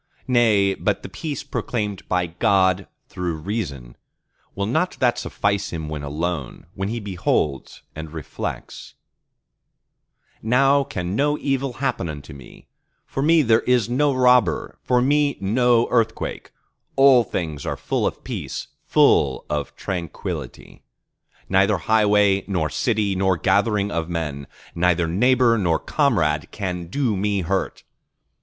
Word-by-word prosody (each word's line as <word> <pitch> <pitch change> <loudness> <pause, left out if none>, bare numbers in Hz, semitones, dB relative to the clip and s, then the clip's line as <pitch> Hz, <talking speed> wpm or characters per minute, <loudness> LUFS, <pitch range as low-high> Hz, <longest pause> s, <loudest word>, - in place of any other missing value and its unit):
nay, 110 -6 +3
but 105 +1 -2
the - - -7
peace 145 - -5
proclaimed 105 -5 -4
by 90 -1 +1
God 95 +1 +2 0.2
through 90 -2 -3
reason, 75 - -5 0.6
will 100 - -1
not 155 - 0
that 120 -2 +2
suffice 100 -1 -1
him 80 -2 -5
when 75 -1 -4
alone, 75 0 -4
when 95 -1 -3
he 120 +2 -3
beholds 85 - -2
and 80 0 -7
reflects:—Now 125 - -4
can 95 -8 -4
no 145 +4 +1
evil 135 -2 -1
happen 125 -9 -2
unto 75 0 -8
me; 70 -3 -14 0.4
for 135 - -4
me 160 +2 +4
there 115 -2 +4
is 125 -3 +1
no 145 +3 +2
robber, 125 - +2
for 125 -1 +2
me 145 +1 +2
no 120 +4 +2
earthquake; 115 -2 -1 0.5
all 135 -3 +6
things 80 -8 -4
are - - -2
full - - -1
of - - -6
peace, - - -5 0.2
full - - +3
of 75 -2 -3
tranquillity; 85 -4 -6 0.7
neither 95 +2 +3
highway 105 0 +3
nor 85 -6 -1
city 110 -4 0
nor 95 -1 +1
gathering 105 +3 +1
of 85 -2 -2
men, 75 -5 -4 0.3
neither 85 -1 +2
neighbor 120 +5 +3
nor 85 -4 +2
comrade 80 - 0
can 90 -4 -4
do 120 +2 0
me 100 0 0
hurt. 95 +3 -2
100 Hz, 130 wpm, -22 LUFS, 85-120 Hz, 0.7 s, all